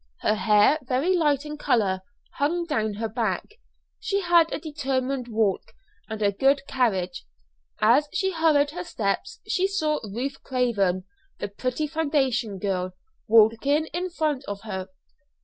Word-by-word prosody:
Her - - +2
hair, 210 +7 +4
very 270 +8 +1
light 295 -4 +2
in 300 0 -7
colour, 195 -8 +1 0.4
hung 340 +5 0
down 220 -10 -1
her 225 +2 -2
back. 220 -4 -1 0.5
She 400 0 -1
had 345 -2 +4
a - - -1
determined 270 -4 -2
walk 220 -4 0 0.4
and 215 -1 -3
a 200 - +3
good 275 +7 +2
carriage. 190 - -1 0.5
As 255 +7 +4
she 385 -3 0
hurried 310 -4 +3
her 355 +3 -5
steps 220 - -3
she 375 +1 +1
saw 315 -6 0
Ruth 245 +7 -4
Craven, 205 -8 0 0.3
the - - -4
pretty 255 +8 -2
foundation 275 -9 0
girl, 185 -1 -2 0.3
walking 230 +8 +4
in 360 +2 -2
front 305 -6 -1
of 200 -1 -5
her. 190 -4 -5
255 Hz, 145 wpm, -25 LUFS, 210-305 Hz, 0.5 s, hair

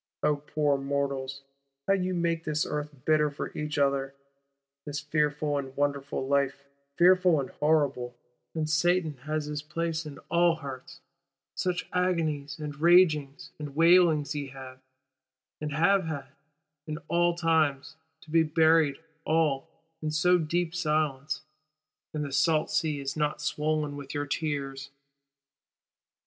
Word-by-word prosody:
O 150 -1 +3
poor 145 -1 0
mortals, 140 -1 -2 0.4
how 195 - +4
ye 185 -1 0
make 170 -2 0
this 155 -1 0
Earth 150 0 -3 0.2
bitter 155 -1 +3
for 145 - -6
each 150 -1 -3
other; 140 -1 +1 0.7
this 145 0 -4
fearful 150 -1 0
and 135 -1 -8
wonderful 140 -2 -1
Life 140 0 +1 0.3
fearful 180 -2 +5
and 135 - -4
horrible; 140 -5 +1 0.4
and 155 -1 -1
Satan 160 -1 +1
has 155 -1 -1
his 150 0 -4
place 165 +1 -3
in 145 - -9
all 170 0 +4
hearts! 135 -5 -9 0.5
Such 180 -1 -2
agonies 160 -5 0
and 150 -1 -7
ragings 160 -5 +4
and 145 -2 -7
wailings 165 -2 +5
ye 145 -2 -4
have, 130 -1 -10 0.8
and 150 -1 -3
have 190 +6 +3
had, 150 -4 -5 0.6
in 155 -1 -3
all 175 0 +2
times:—to 160 -1 -1
be 165 0 +5
buried 160 -2 +3 0.3
all, 155 -4 +1 0.3
in 155 - -2
so 180 +4 +3
deep 170 +1 -1
silence; 155 -3 -1 0.7
and 150 -1 -3
the 140 - -6
salt 155 +3 +2
sea 150 -3 0
is 135 -1 -4
not 150 -1 -1
swoln 150 0 -1
with 140 -1 -8
your 145 0 -1
tears. 135 -2 -3
150 Hz, 135 wpm, -28 LUFS, 140-160 Hz, 0.8 s, fearful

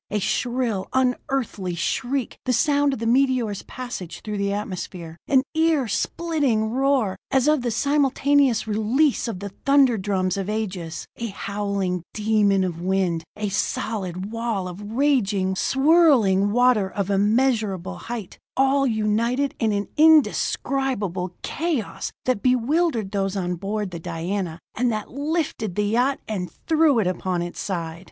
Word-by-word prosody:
A 210 - -1
shrill, 235 -1 -1
unearthly 250 -7 -1
shriek 245 - -2
the 255 - +1
sound 285 +3 +3
of - - -3
the 230 - -4
meteor's 245 -4 +2
passage 245 -9 -7
through 210 -1 -3
the 200 0 0
atmosphere; 185 -4 -5
an 265 -2 +4
ear 320 -5 +2
splitting 265 -3 0
roar, 260 -6 +1
as 265 +1 +2
of 305 -3 +3
the 240 - -1
simultaneous 280 0 +2
release 230 +8 +1
of 205 -5 -5
the 200 - -4
thunder 265 +2 +3
drums 185 -1 0
of 195 0 -3
ages; 185 -6 -4
a 235 - -3
howling 200 -3 -2
demon 210 -3 +2
of 170 -2 -3
wind; 180 -3 0
a 210 -1 -2
solid 195 -1 -2
wall 230 -5 -2
of 180 +2 -8
raging, 205 -5 +1
swirling 270 - +4
water 245 -4 +3
of 200 0 -2
immeasurable 210 -2 +1
height 230 -5 -7 0.2
all 270 +1 +3
united 230 +5 0
in 220 -1 +2
an 205 0 -1
indescribable 270 - +2
chaos 315 -8 -2
that 255 -5 +1
bewildered 255 - +1
those 195 -1 -1
on 180 -2 -1
board 200 +2 -3
the 170 - -6
Diana, 170 +1 -3 0.2
and 245 +1 +1
that 215 -1 -4
lifted 285 - -2
the 210 - +1
yacht 245 +6 +1
and 185 -5 -3 0.2
threw 315 -4 +4
it 220 - +2
upon 180 -1 -1
its 175 - -7
side! 165 -4 -4
220 Hz, 145 wpm, -23 LUFS, 195-265 Hz, 0.2 s, an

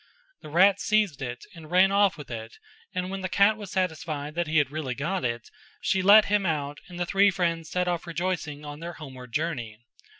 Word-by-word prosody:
The - - -10
rat 190 +5 +5
seized 210 -9 +1
it 125 -2 -5
and 160 -3 -12
ran 185 +2 +5
off 200 -2 +3
with 150 -4 -10
it 115 -1 -7 0.3
and 180 +1 -3
when 195 0 -4
the 185 - -3
cat 200 +3 +4
was 210 -2 -9
satisfied 155 -5 -2
that 170 0 -1
he 155 +1 +1
had 145 -3 +2
really 145 -5 -3
got 155 +6 -2
it, 120 -2 -3 0.3
she 190 - +1
let 205 +3 +8
him 205 0 +1
out 145 -4 -2
and 175 -1 -9
the 175 - 0
three 200 +3 +4
friends 170 -4 -1
set 180 0 -1
off 175 -1 -2
rejoicing 165 -3 -3
on 145 0 -7
their 170 +1 -6
homeward 130 -6 -10
journey. 125 -8 -3
170 Hz, 210 wpm, -26 LUFS, 145-190 Hz, 0.3 s, let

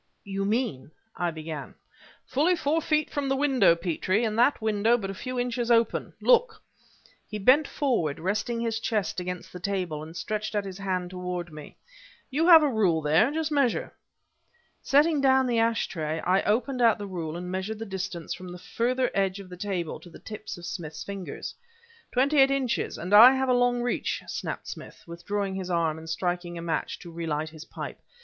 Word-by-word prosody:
"You 195 0 -3
mean," 210 - -1 0.3
I 175 - 0
began... 155 -3 -7 0.5
"Fully 305 +8 +2
four 320 0 0
feet 305 -1 0
from 285 -2 -2
the 270 - +2
window, 270 -10 +4
Petrie, 180 +5 0
and 215 -2 0
that 250 +4 +4
window 220 +1 +2
but 195 -4 -4
a - - -6
few 255 +5 -4
inches 245 -1 -1
open! 230 -1 +2
Look" 475 -2 +3 0.7
he 215 - -4
bent 260 +9 +5
forward, 225 - 0
resting 210 +6 -1
his 225 -1 -1
chest 210 -5 -1
against 180 0 -6
the 180 - -7
table, 180 -5 -2
and 160 +2 -9
stretched 215 +5 -3
out 205 -1 0
his 190 0 -7
hand 185 -2 -2
toward 180 -2 -5
me. 150 -1 -11 0.5
"You 315 +6 +1
have 325 -3 +9
a - - +4
rule 195 - +2
there; 160 - +4
just 315 0 -2
measure." 275 -5 +1 0.9
Setting 295 +1 +3
down 265 -1 +4
the 240 -2 +1
ash 230 0 +2
tray, 160 -2 -3
I 185 +2 +2
opened 250 +4 0
out 230 -2 +5
the 205 - -6
rule 170 -4 -5
and 180 +1 -6
measured 190 +4 -3
the 225 - -5
distance 190 -4 -4
from 180 +1 -9
the 180 - -8
further 250 +7 -1
edge 195 0 0
of 195 -2 -10
the 180 - -8
table 180 -3 -3
to 175 - -14
the - - -12
tips 215 -2 -8
of 175 - -9
Smith's 160 -5 -6
fingers. 195 -2 -6 0.6
"Twenty 275 +4 +3
eight 270 0 +7
inches 270 -3 -1
and 180 +4 -4
I 235 +5 +10
have 265 0 0
a - - +5
long 245 0 +2
reach!" 245 - -1
snapped - - -5
Smith, - - -9
withdrawing 195 +4 -3
his 190 -1 -4
arm 165 -3 0
and 160 0 -10
striking 175 +1 -2
a - - -5
match 165 -2 -2
to 175 - -10
relight 160 -2 -3
his 160 0 -11
pipe. - - -7
200 Hz, 195 wpm, -27 LUFS, 175-245 Hz, 0.9 s, I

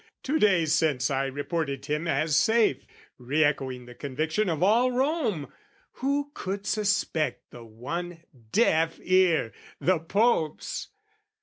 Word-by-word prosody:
"Two 305 +4 0
days 175 -7 +3
since, 145 -6 +1
I 135 0 0
reported 140 0 -3
him 150 +3 -2
as 155 +1 +1
safe, 220 - +2 0.3
"Re 140 +6 +1
echoing 130 -4 -1
the 125 - -11
conviction 155 - -2
of 160 0 -1
all 235 +6 +4
Rome: 250 - -1 0.5
"Who 285 +2 0
could 195 -2 -5
suspect 205 -7 -1
the 120 - -11
one 165 +10 -6 0.3
deaf 165 - +2
ear 180 - +2 0.3
the 185 -2 +2
Pope's? 165 -2 0
165 Hz, 125 wpm, -27 LUFS, 140-205 Hz, 0.5 s, all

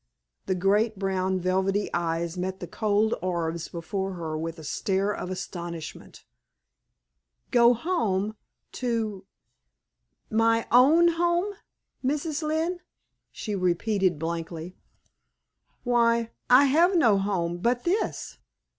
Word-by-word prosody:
The 190 - +1
great 205 +4 +2
brown 190 -1 0
velvety 190 +3 0
eyes 170 0 -1
met 185 +1 -3
the - - -5
cold 215 +3 +1
orbs 170 -2 -2
before 190 +3 -4
her 165 -3 -4
with 165 +1 -4
a 160 - -10
stare 195 +6 -1
of 180 - -5
astonishment. 175 -3 -7 1.3
"Go 240 0 +6
home 220 - -1 0.5
to 220 -6 -2 1.0
my 230 +1 +3
own 295 +8 +6
home, 345 +4 +1 0.5
Mrs. 295 +3 -1
Lynne?" 320 +3 -1 0.5
she 210 - -5
repeated, 185 0 +1
blankly. 165 +2 -5 1.1
"Why, 235 -1 +2 0.2
I 255 +3 +7
have 335 +7 +4
no 220 -11 +4
home 175 -3 -1
but 240 +5 0
this!" 380 +5 -2
200 Hz, 110 wpm, -26 LUFS, 180-240 Hz, 1.3 s, I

